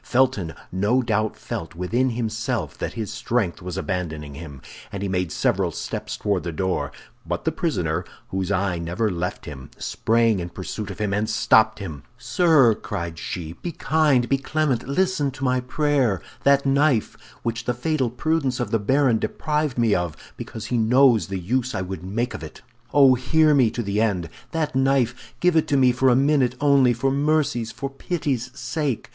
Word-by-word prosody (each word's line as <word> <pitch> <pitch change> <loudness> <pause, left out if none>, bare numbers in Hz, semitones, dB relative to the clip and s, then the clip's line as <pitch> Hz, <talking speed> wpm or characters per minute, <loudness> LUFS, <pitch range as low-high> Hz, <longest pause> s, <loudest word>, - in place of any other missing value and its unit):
Felton 115 -10 +1 0.2
no 105 +8 +2
doubt 110 -2 0
felt 80 0 -6
within 115 +9 0
himself 115 -1 -2
that - - -3
his 110 -2 -4
strength 110 -4 -1
was 90 0 -5
abandoning 80 -7 -3
him, 70 -2 -9 0.3
and 100 0 -4
he - - -1
made 90 -3 -1
several - - +1
steps - - -5
toward 100 -3 0
the 85 - -4
door; 95 +3 -1 0.3
but - - -4
the - - +2
prisoner, - - -1 0.3
whose 95 0 -2
eye 95 -3 0
never 90 +6 -1
left 90 +2 -4
him, 65 -3 -9
sprang 115 -2 +1
in 85 0 -4
pursuit 95 +4 -6
of 95 - -7
him 105 -2 -1
and 105 +2 0
stopped 110 0 +4
him. 80 -9 -7 0.2
"Sir," 155 -10 +4
cried 85 -5 -5
she, 80 -3 -5
"be 175 - -3
kind, 150 -5 +2
be 135 +1 +1
clement, 140 -3 -1
listen 180 0 +1
to 135 0 -8
my 130 -1 +2
prayer! 125 - +1 0.2
That 140 0 +4
knife, 140 -4 +2 0.3
which 115 0 -3
the 125 - 0
fatal 135 0 0
prudence 135 +1 -1
of 120 - -2
the 115 - +2
baron 130 +2 +2
deprived 150 +5 -1
me 115 -3 +3
of, 85 -4 -1 0.2
because 110 -1 -7
he 120 +1 0
knows 120 0 +4
the 95 -1 -3
use 125 +8 -1
I 95 - -1
would 95 -2 -6
make 115 +6 -2
of - - -6
it! - - -10 0.3
Oh, 140 -2 +7
hear 150 +5 +3
me 130 -5 +4
to 120 +2 -4
the 100 +1 0
end! 95 -7 0 0.2
that 160 -4 -2
knife, 130 -2 +1
give 180 -1 +3
it 160 - +3
to 140 - +2
me 130 -2 +5
for 130 +2 +3
a 125 - +5
minute 135 -1 +3
only, 140 -3 +5
for 125 +3 0
mercy's, 140 -5 +1
for 135 - -4
pity's 135 -3 -3
sake! 130 0 -2
120 Hz, 185 wpm, -23 LUFS, 95-135 Hz, 0.3 s, Oh